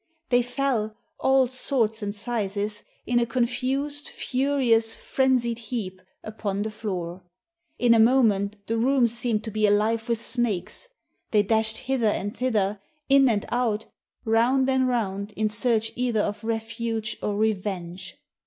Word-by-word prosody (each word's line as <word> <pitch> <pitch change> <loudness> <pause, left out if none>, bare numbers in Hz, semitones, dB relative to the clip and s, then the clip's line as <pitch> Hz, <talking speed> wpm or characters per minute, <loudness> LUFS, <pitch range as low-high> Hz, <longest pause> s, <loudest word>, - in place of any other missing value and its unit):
They 245 -1 +4
fell, 245 -4 -1 0.2
all 265 0 +4
sorts 245 -3 0
and 205 0 -3
sizes, 210 -2 -2 0.2
in 240 0 +2
a 235 - +2
confused, 260 +4 -1
furious, 255 -4 +1
frenzied 250 -3 +1
heap, 210 -5 -5 0.2
upon 205 -2 -3
the 220 - -3
floor. 185 -5 -4 0.6
In 240 -1 +5
a 230 - +4
moment 220 -4 +4
the 225 +1 -1
room 260 +1 +3
seemed 235 -2 -1
to 220 - -5
be 215 0 +2
alive 220 +3 +1
with 230 -1 +1
snakes. 235 - -2 0.4
They 210 -2 +3
dashed 220 +1 +1
hither 260 -3 0
and 205 0 -1
thither, 210 -5 0 0.3
in 275 -1 +6
and 210 -3 0
out, 235 -3 0 0.4
round 240 +4 +3
and 260 -1 +2
round, 205 -4 -2
in 215 +1 0
search 225 0 0
either 240 -3 +1
of 205 +1 -3
refuge 225 0 -3
or 205 -1 -1
revenge. 190 -4 -2
225 Hz, 145 wpm, -25 LUFS, 210-245 Hz, 0.6 s, in